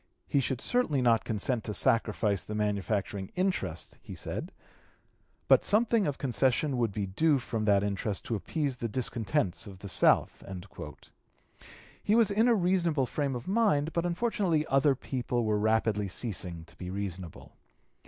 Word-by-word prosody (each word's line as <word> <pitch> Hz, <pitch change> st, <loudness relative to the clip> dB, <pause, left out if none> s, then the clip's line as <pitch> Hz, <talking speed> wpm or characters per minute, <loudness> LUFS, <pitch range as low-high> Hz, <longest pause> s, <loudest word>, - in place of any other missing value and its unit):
"He 140 Hz, -, +2 dB
should 130 Hz, -1 st, -1 dB
certainly 245 Hz, -, +1 dB
not 115 Hz, -3 st, +3 dB
consent 110 Hz, +2 st, -1 dB
to 105 Hz, -, -3 dB
sacrifice 105 Hz, -2 st, +2 dB
the 105 Hz, -, -6 dB
manufacturing 100 Hz, -2 st, -2 dB
interest," 185 Hz, 0 st, -2 dB
he -, -, -9 dB
said, -, -, -5 dB, 1.0 s
"but -, -, +6 dB
something 220 Hz, 0 st, +3 dB
of 145 Hz, -, -2 dB
concession 130 Hz, +1 st, +1 dB
would 115 Hz, -3 st, +1 dB
be 100 Hz, 0 st, -2 dB
due 145 Hz, +11 st, +2 dB
from 115 Hz, -3 st, -3 dB
that 100 Hz, -1 st, +4 dB
interest 100 Hz, 0 st, -2 dB
to -, -, -3 dB
appease 140 Hz, -, -2 dB
the 115 Hz, -1 st, -3 dB
discontents 105 Hz, -6 st, -1 dB
of 95 Hz, -2 st, -10 dB
the 100 Hz, -, -9 dB
South." 95 Hz, -, +3 dB, 1.6 s
He 210 Hz, -, +2 dB
was 230 Hz, -3 st, +4 dB
in 220 Hz, +4 st, +3 dB
a 240 Hz, -, +5 dB
reasonable 175 Hz, -7 st, +2 dB
frame 140 Hz, +1 st, -2 dB
of 120 Hz, -, -6 dB
mind; 190 Hz, -8 st, +2 dB
but 170 Hz, -, 0 dB
unfortunately 175 Hz, -4 st, 0 dB
other 135 Hz, 0 st, +3 dB
people 120 Hz, -2 st, -2 dB
were 105 Hz, -1 st, +1 dB
rapidly 110 Hz, -1 st, +1 dB
ceasing 90 Hz, -5 st, -4 dB
to 80 Hz, -, -17 dB
be 90 Hz, -, -7 dB
reasonable. 95 Hz, -3 st, -6 dB
120 Hz, 155 wpm, -29 LUFS, 105-155 Hz, 1.6 s, but